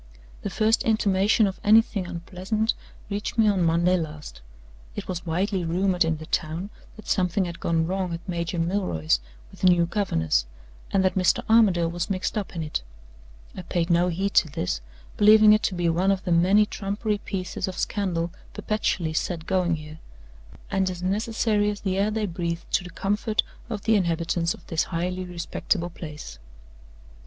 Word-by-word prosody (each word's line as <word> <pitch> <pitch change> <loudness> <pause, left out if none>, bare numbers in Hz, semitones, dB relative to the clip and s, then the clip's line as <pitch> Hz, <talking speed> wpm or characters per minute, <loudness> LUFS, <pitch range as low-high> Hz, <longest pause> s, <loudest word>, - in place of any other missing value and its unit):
"The - - -3
first 220 +1 +2
intimation 210 -1 +3
of 195 -1 -3
anything 215 -3 +4
unpleasant 185 +5 -2 0.4
reached 205 +3 -3
me 220 -1 +5
on 200 -3 +2
Monday 170 +2 +3
last. 150 - -7 0.5
It - - -5
was 180 -1 -5
widely 185 +3 0
rumored 180 +2 +1
in 165 -1 0
the 155 - -9
town 165 +7 -2 0.2
that 215 - -13
something 185 0 +1
had 170 -1 -6
gone 165 -1 +1
wrong 185 0 -2
at 165 +2 -6
Major 170 -1 -2
Milroy's 165 - 0 0.3
with - - -15
the 185 - +4
new 175 -1 +5
governess, 80 - 0 0.4
and 190 -1 +2
that 185 - +2
Mr. 185 -2 +2
Armadale 195 -7 +4
was 175 0 -3
mixed 190 -1 -2
up 205 -4 -4
in 165 - -2
it. 150 - -3 0.7
I - - -5
paid 175 0 -1
no 170 +1 +4
heed 190 +3 -1
to 160 - +4
this, 90 - -2 0.4
believing 215 0 +7
it 215 - +3
to 190 - -1
be 175 -1 0
one 175 +4 +2
of 195 -1 +1
the 180 - -2
many 185 +5 +5
trumpery 205 +1 -2
pieces 185 -2 -4
of 185 - -5
scandal 175 -4 -1 0.2
perpetually 185 -6 -1
set 165 +1 -2
going 180 -3 +1
here, 155 0 -10 0.7
and 190 -1 +1
as 180 -1 -6
necessary 210 +1 +1
as 205 -1 -4
the 190 -1 -1
air 205 +2 +2
they 215 0 -1
breathe 170 -2 -3
to - - +2
the 180 - -8
comfort 205 +5 0 0.3
of 215 -4 -4
the 220 0 +3
inhabitants 170 -2 0
of - - -19
this 160 - 0
highly 180 +2 -3
respectable 175 0 -2
place. 150 - -9
185 Hz, 175 wpm, -25 LUFS, 170-200 Hz, 0.7 s, believing